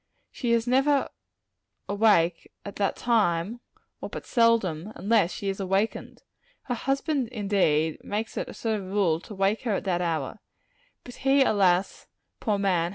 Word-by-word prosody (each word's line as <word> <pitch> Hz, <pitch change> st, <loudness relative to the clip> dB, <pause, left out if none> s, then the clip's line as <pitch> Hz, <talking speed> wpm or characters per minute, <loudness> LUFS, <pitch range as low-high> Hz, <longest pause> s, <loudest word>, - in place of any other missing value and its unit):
She 240 Hz, -, -2 dB
is 230 Hz, 0 st, +2 dB
never 270 Hz, +3 st, +2 dB, 0.8 s
awake 200 Hz, -5 st, +2 dB
at 200 Hz, -, -7 dB
that 200 Hz, -1 st, 0 dB
timer 215 Hz, -2 st, +1 dB, 0.4 s
or -, -, -5 dB
but -, -, -7 dB
seldom, 215 Hz, -, +2 dB
unless 200 Hz, -2 st, +2 dB
she 200 Hz, -, -5 dB
is 195 Hz, 0 st, -2 dB
awakened. 195 Hz, +3 st, -2 dB, 0.4 s
Her 250 Hz, -, -3 dB
husband, 270 Hz, +2 st, -1 dB
indeed, 195 Hz, -9 st, 0 dB
makes 215 Hz, +2 st, -4 dB
it -, -, -3 dB
a -, -, -8 dB
sort 220 Hz, -2 st, -1 dB
of 190 Hz, -, -8 dB
rule 185 Hz, -5 st, +1 dB
to 210 Hz, -, -11 dB
wake 195 Hz, +3 st, +1 dB
her 225 Hz, -5 st, -1 dB
at -, -, -3 dB
that 180 Hz, -3 st, 0 dB
hour; 165 Hz, +2 st, -2 dB, 0.6 s
but 245 Hz, -, -11 dB
he, 270 Hz, 0 st, +4 dB
alas, 190 Hz, -5 st, +1 dB, 0.3 s
poor 210 Hz, -2 st, 0 dB
man! 180 Hz, -4 st, +1 dB
205 Hz, 160 wpm, -26 LUFS, 180-230 Hz, 0.8 s, he